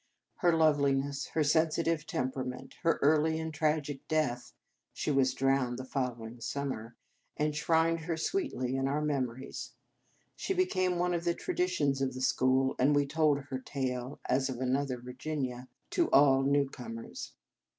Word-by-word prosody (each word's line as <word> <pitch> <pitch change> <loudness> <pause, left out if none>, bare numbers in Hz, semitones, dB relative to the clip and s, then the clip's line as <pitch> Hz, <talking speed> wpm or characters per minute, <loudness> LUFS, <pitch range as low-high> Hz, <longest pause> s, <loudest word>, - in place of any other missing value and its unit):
Her 175 -3 +3
love 160 -2 +4
liness, 140 0 0
her 160 - +2
sensitive 160 +1 +1
temperament, 130 0 -3
her 165 - +2
early 155 +2 +3
and 160 0 -4
tragic 150 -2 -1
death 125 -6 0 0.4
(she - - -2
was 135 -2 +2
drowned 135 -2 +1
the 130 - -6
following 120 -3 -4
summer), 125 -5 -4 0.4
en 150 0 +1
shrined 165 +2 +2
her 165 -1 -1
sweetly 160 - -1
in 135 0 0
our 145 +2 0
memories. 130 -3 -3 0.6
She 385 - -2
became 185 - +1
one 180 0 +1
of 170 -1 -1
the 170 -1 +1
traditions 155 - 0
of 130 -1 -1
the 130 - -5
school, 130 +1 +2
and 145 +3 +4
we 145 0 +3
told 150 -1 +2
her 130 - -2
tale 130 -1 -4
as 130 +2 +1
of 125 -2 -4
another 130 0 0
Virginia 125 0 -4 0.2
to 340 -2 +2
all 135 -1 +6
new 140 +1 +2
comers. 115 -3 -8
140 Hz, 155 wpm, -31 LUFS, 130-155 Hz, 0.6 s, all